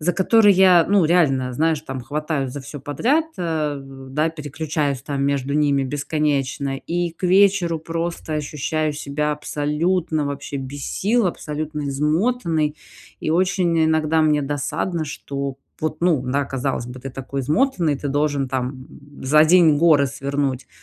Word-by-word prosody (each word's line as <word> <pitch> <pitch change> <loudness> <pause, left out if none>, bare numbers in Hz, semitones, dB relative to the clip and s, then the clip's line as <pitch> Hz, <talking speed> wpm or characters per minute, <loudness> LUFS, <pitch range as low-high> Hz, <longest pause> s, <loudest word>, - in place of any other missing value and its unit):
за 175 +4 +1
которые, 205 +3 +5
я, 180 -2 +6
ну, 200 -3 +4
реально, 140 -7 +2
знаешь, 155 +3 +1
там, 135 -4 -6
хватаюсь 145 +1 -3
за 145 - -6
всё 145 +1 -9
подряд, 240 - +1
а, 155 -4 -1
да, 135 +3 -3
переключаюсь 150 -2 -3
там 140 -1 -3
между 140 0 0
ними 145 -2 +2
бесконечно. 140 -1 -1
И 175 +4 -2
к 165 - -24
вечеру, 185 -2 +3
просто, 165 0 -4
ощущаю 150 +1 -2
себя 150 +1 -2
абсолютно, 150 +2 -1
вообще 140 0 -5
без 135 +1 -6
сил, 225 +2 +1
абсолютно 150 -2 -4
измотанной. 155 - 0 0.4
И - - -2
очень, 175 -1 +2
иногда, 160 0 +2
мне 150 -2 +3
досадно, 145 +4 -2
что 140 -2 -5 0.2
вот, 155 0 -3
ну 170 -6 +2
да, 140 +3 0
казалось 135 -2 -3
бы, 125 +1 -9
ты 135 - -6
такой 135 +1 -5
измотанный, 155 - +1
ты 145 - -4
должен, 145 -1 0
там, 130 0 -4 0.4
за 150 +3 +5
день 165 -2 +5
горы 150 -3 +4
свернуть, 140 -1 -3
150 Hz, 145 wpm, -21 LUFS, 140-165 Hz, 0.4 s, я